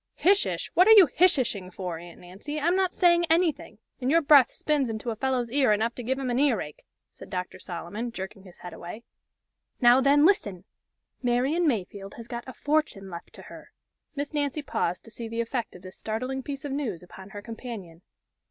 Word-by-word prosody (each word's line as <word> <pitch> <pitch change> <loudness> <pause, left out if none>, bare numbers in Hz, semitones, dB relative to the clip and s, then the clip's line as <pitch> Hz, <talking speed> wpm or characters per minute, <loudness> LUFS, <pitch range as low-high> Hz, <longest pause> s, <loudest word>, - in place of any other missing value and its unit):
"'Hish 395 +3 +3
ish!' - - -4
What 365 +3 +5
are 445 - +9
you 405 -4 +9
'hish 360 0 +4
ish'ing 205 -8 -2
for, 180 -3 -5
Aunt 175 0 -12
Nancy, 200 +13 -6
I'm 340 +4 +2
not 375 -1 +1
saying 345 -1 +4
anything, 325 - +1 0.2
and 255 0 -1
your 330 +2 +4
breath 285 -3 +6
spins 290 -5 0
into 225 +2 -3
a - - -4
fellow's 250 -1 -1
ear 270 -3 +3
enough 220 +3 +1
to 245 - -7
give 260 +3 -1
him 265 -2 -2
an 240 - 0
ear 275 -7 +3
ache!" 150 - -8 0.3
said - - -13
Dr. 180 -1 -5
Solomon, 190 +7 -6
jerking 190 -2 -7
his 185 -2 -16
head 180 - -9
away. 195 +7 -9 0.8
"Now 245 +1 +6
then 285 +2 +5
listen 205 - +1 0.6
Marian 265 +7 +1
Mayfield 200 -5 -3
has 230 -1 -10
got 240 0 -6
a 260 - -7
fortune 290 -11 -1
left 170 0 -9
to - - -12
her." - - -13 0.4
Miss 285 +2 -4
Nancy 290 0 -1
paused 180 -10 -2
to 225 - -12
see 235 0 -7
the 230 +1 -5
effect 235 -2 -3
of 180 - -13
this 185 0 -10
startling 255 +5 -3
piece 280 +2 -6
of 285 - -4
news 245 - -3
upon 190 +2 -12
her 205 +1 -8
companion. 220 -8 -8
240 Hz, 210 wpm, -27 LUFS, 195-290 Hz, 0.8 s, are